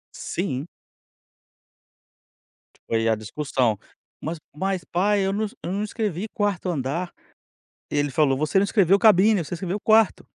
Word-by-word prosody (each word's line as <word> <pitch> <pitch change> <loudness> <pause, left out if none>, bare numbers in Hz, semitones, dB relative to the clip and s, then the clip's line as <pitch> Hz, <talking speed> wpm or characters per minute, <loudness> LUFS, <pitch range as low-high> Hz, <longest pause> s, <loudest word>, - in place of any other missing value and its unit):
Sim. 165 -5 -3 2.2
Foi 115 0 +1
a 110 - +3
discussão. 115 0 -1 0.4
"Mas 160 +2 -4 0.2
mas 190 +1 -2
pai 200 +3 +1
eu 195 - 0
não 215 +1 0
es 205 - -9
eu 175 - -3
não 200 +2 -1
escrevi 210 -3 -3
4º 205 -3 -1
andar. 165 +4 -2 0.8
E 150 - -1
ele 145 -1 +1
falou: 135 -2 +2
"Você 155 +6 0
não - - +3
escreveu 195 -2 +3
cabine, 210 -3 +5
você 165 - -7
escreveu 190 +3 -3
quarto". 220 0 +3
180 Hz, 145 wpm, -24 LUFS, 145-200 Hz, 2.2 s, cabine